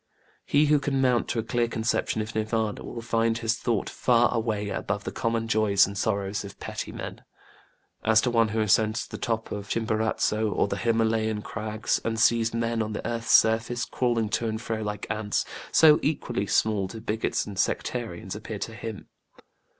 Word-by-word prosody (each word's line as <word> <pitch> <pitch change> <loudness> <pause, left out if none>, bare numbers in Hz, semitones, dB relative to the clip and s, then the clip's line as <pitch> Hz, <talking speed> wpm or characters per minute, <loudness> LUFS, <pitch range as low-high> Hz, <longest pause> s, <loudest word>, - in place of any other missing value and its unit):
He 145 +2 +4
who 150 0 +4
can 140 -1 -1
mount 125 -2 +2
to - - -2
a 115 - 0
clear 120 +1 0
conception 110 -1 -1
of 110 +1 -8
NirvÄnĖĢa 110 0 -1
will 115 - -7
find 115 0 +1
his 115 0 -1
thought 115 -4 0
far 120 -1 +2
away 110 -3 -1
above 105 0 -3
the - - -4
common 115 -1 -1
joys 110 -3 +4
and 100 - -7
sorrows 100 -1 -1
of 100 -1 -10
petty - - -5
men. - - -7 0.8
As 110 0 +5
to 125 - 0
one 115 -1 +3
who 110 +1 -1
ascends 110 +1 +2
to - - -14
the - - -6
top 115 -1 -2
of 100 -1 -5
Chimborazo 110 -1 0
or - - +1
the 100 - -3
HimÄlayan 110 -1 +1
crags, 110 0 -2
and 115 -1 -2
sees 115 -1 +3
men 115 0 -1
on 110 0 -2
the 105 - -4
earth's 115 -1 -3
surface 115 +2 +3
crawling 120 -4 0
to 115 +2 0
and 110 0 -2
fro 115 -1 -3
like 105 -1 -4
ants, 105 -1 -1 0.3
so 155 -2 +7
equally 120 -8 -1
small 105 -1 +1
do 110 +4 -8
bigots 110 +1 -1
and 100 -2 -7
sectarians 110 -4 -2
appear 110 0 -6
to 115 - -5
him. 110 -1 -7
110 Hz, 190 wpm, -26 LUFS, 105-115 Hz, 0.8 s, so